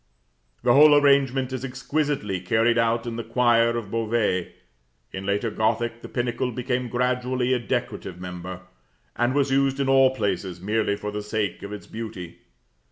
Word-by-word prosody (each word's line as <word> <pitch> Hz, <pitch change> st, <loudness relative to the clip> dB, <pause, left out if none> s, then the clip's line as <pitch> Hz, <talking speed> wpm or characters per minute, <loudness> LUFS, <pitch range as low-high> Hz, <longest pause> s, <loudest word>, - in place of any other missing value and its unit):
The 120 Hz, -1 st, +4 dB
whole 150 Hz, +2 st, +8 dB
arrangement 135 Hz, -2 st, +3 dB
is 130 Hz, -1 st, -4 dB
exquisitely 135 Hz, -5 st, -2 dB
carried 115 Hz, +6 st, +2 dB
out 115 Hz, 0 st, +1 dB
in 115 Hz, -1 st, -4 dB
the 115 Hz, -, -3 dB
choir 115 Hz, 0 st, +3 dB
of 105 Hz, -4 st, -6 dB
Beauvais. 110 Hz, -5 st, 0 dB, 0.6 s
In 95 Hz, +1 st, -6 dB
later 105 Hz, +3 st, 0 dB
Gothic 115 Hz, +2 st, -1 dB
the -, -, -9 dB
pinnacle 120 Hz, +1 st, -2 dB
became 125 Hz, +1 st, -2 dB
gradually 125 Hz, +1 st, 0 dB
a 125 Hz, -, +1 dB
decorative 100 Hz, -6 st, -4 dB
member, 90 Hz, 0 st, -7 dB, 0.5 s
and 120 Hz, +2 st, +1 dB
was 140 Hz, -1 st, +2 dB
used 135 Hz, 0 st, +2 dB
in 135 Hz, -, 0 dB
all 135 Hz, -1 st, +5 dB
places 95 Hz, -5 st, -2 dB
merely 105 Hz, +2 st, 0 dB
for 105 Hz, 0 st, -5 dB
the 105 Hz, 0 st, -4 dB
sake 105 Hz, -2 st, -3 dB
of 100 Hz, -, -7 dB
its 105 Hz, -, -7 dB
beauty. 100 Hz, -6 st, -8 dB
115 Hz, 165 wpm, -24 LUFS, 105-130 Hz, 0.6 s, whole